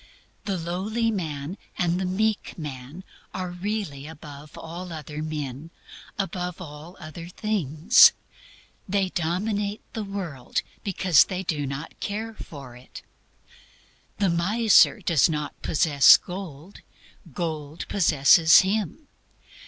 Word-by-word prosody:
The 195 -2 -1
lowly 195 +7 -1
man 160 -2 -4 0.2
and 175 +1 0
the 185 - -1
meek 215 +3 -1
man 145 +2 -8 0.3
are 185 -1 -3
really 180 -6 -4
above 150 -1 -11
all 175 +2 -8
other 155 -1 -6
men, 150 -1 -5 0.5
above 180 -3 -3
all 155 +1 -10
other 165 0 -9
things. 180 - +4 0.8
They 195 -1 +1
dominate 200 +5 -2
the 220 - -3
world 185 -10 -4 0.2
because 185 -6 +4
they 185 -1 -4
do 150 -5 -2
not 140 +4 -7
care 220 +2 -4
for 140 - -10
it. 125 +1 -12 1.1
The 200 -2 +2
miser 205 +6 +4
does 165 -2 +3
not 150 -2 -4
possess 145 -3 +6
gold, 180 -2 -9 0.6
gold 155 -2 -4
possesses 160 -2 +6
him. 210 - -2
170 Hz, 115 wpm, -25 LUFS, 150-195 Hz, 1.1 s, possess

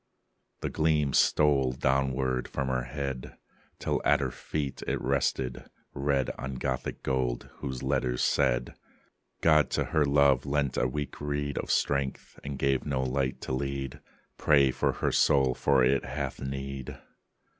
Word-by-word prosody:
The - - -2
gleam 75 -3 +1
stole 70 -3 +3
downward 65 -1 0
from 70 -2 -3
her 65 -1 -1
head, 70 -1 -5 0.4
Till - - -1
at - - +4
her 65 -2 -1
feet 70 +1 -4
it - - 0
rested, 60 -2 -1 0.2
red 70 -2 0
On 65 0 -4
Gothic 65 0 -3
gold, 65 -2 -1
whose 65 -1 -5
letters 65 -3 0
said: 60 -4 +1 0.7
"God 75 -2 +5
to - - 0
her 80 - +4
love 70 -2 +4
lent 70 -1 0
a 60 - +2
weak 75 +3 -5
reed 70 -1 -2
Of - - -5
strength: 70 -2 -1
and 70 -1 -5
gave 70 -1 +1
no 65 -3 -1
light 65 0 -1
to - - -5
lead: 70 +1 -3 0.4
Pray 70 -3 +5
for - - 0
her - - -1
soul: 65 -3 +4
for 65 +1 +3
it 65 +2 +3
hath 70 0 -4
need." 70 -1 -5
70 Hz, 150 wpm, -29 LUFS, 65-70 Hz, 0.7 s, God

